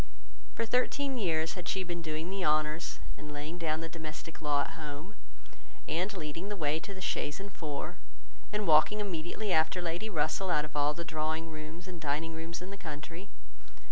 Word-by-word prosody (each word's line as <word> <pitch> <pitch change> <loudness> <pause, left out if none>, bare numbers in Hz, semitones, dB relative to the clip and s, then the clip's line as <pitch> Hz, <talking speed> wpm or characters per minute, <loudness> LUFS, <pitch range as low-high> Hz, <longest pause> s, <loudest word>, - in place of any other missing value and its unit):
For 230 - +1
thirteen 255 +3 +2
years 160 -5 +2
had 180 -2 -5
she 190 +1 +2
been 175 -1 -3
doing 160 +2 -2
the 195 -1 0
honours, 155 +1 +3 0.2
and 150 0 -6
laying 150 +4 -4
down 160 -1 +1
the 165 - -2
domestic 165 0 -6
law 145 -2 +4
at - - -1
home, 150 +5 -6 0.7
and 180 +5 +1
leading 165 +4 -3
the 205 - -1
way 155 -3 +2
to 200 - -7
the 190 - -7
chaise 150 -3 0
and 200 0 -6
four, 155 +2 -3 0.5
and 210 0 +1
walking 160 +6 +7
immediately 185 +1 0
after 160 +3 +4
Lady 175 +5 -1
Russell 165 +2 +2
out 150 -4 +4
of 150 - -11
all 145 +1 +4
the 170 - -3
drawing 160 +1 0
rooms 155 +3 -6
and 175 -3 -6
dining 155 +2 0
rooms 165 +2 -4
in 185 - -6
the 200 - -5
country. 165 +3 -6
165 Hz, 190 wpm, -33 LUFS, 155-185 Hz, 0.7 s, walking